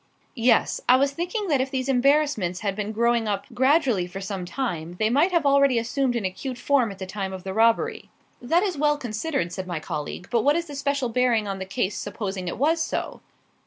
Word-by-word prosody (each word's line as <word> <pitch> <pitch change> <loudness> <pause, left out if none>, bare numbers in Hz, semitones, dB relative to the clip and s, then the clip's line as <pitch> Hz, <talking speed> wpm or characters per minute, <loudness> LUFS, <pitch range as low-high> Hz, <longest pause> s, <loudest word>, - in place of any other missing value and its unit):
"Yes. 235 -1 +2
I 250 - +8
was 275 +2 +2
thinking 360 +8 -3
that 280 -4 +3
if 265 - -2
these 260 -1 -2
embarrassments 270 - +2
had 200 -3 -1
been 210 0 -3
growing 235 0 +1
up 205 -1 -2
gradually 260 - +2
for 185 +2 -7
some 195 -2 -5
time, 175 -7 -4
they 215 +3 +1
might 295 +9 +3
have 340 -4 +1
already 280 -2 +4
assumed 245 +2 0
an 230 -4 -1
acute 240 +7 -4
form 250 -1 +2
at 195 - -10
the 190 - -5
time 190 0 -4
of 190 -1 -7
the 190 - -4
robbery." 230 - +1 0.3
"That 330 +9 +2
is 385 -4 -1
well 295 0 +3
considered," 240 - -3
said 185 -1 -5
my 175 -3 -3
colleague. 155 +3 -5
"But 235 -2 +3
what 290 +6 +3
is 340 0 -1
the 295 - -9
special 280 -2 -1
bearing 235 -3 +1
on 195 -1 -4
the 190 - -4
case 195 0 -2
supposing 195 -2 -4
it - - -4
was 320 +6 +2
so?" - - -3
240 Hz, 220 wpm, -24 LUFS, 195-280 Hz, 0.3 s, I